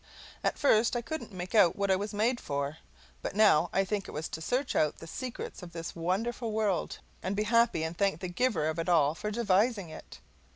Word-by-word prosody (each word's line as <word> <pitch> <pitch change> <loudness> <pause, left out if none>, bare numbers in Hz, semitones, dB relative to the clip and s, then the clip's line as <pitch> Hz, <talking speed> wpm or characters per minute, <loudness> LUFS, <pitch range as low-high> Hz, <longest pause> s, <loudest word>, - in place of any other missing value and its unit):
At - - 0
first 230 -4 +3
I 240 - -1
couldn't 315 -2 -5
make 185 +1 -6
out 190 -6 +5
what 200 -1 0
I - - +5
was 205 +2 -3
made 230 +4 +1
for, 140 +1 -3 0.4
but - - -4
now 175 -6 +5
I 195 - +2
think 200 0 -2
it - - -9
was 155 +1 -3
to 160 - -6
search 250 - -1
out 150 -1 +2
the - - -10
secrets 250 +8 -6
of 175 -1 -10
this 165 0 -6
wonderful 220 +7 -1
world 210 -4 0 0.2
and 190 +2 -2
be 210 - +1
happy 230 -6 +3
and 160 +1 -3
thank 195 +2 +1
the 185 - -4
Giver 175 -4 0
of 160 +1 -2
it 165 - -2
all 150 -4 +4
for 210 +5 -4
devising 210 -2 +1
it. - - -11
195 Hz, 220 wpm, -30 LUFS, 165-225 Hz, 0.4 s, out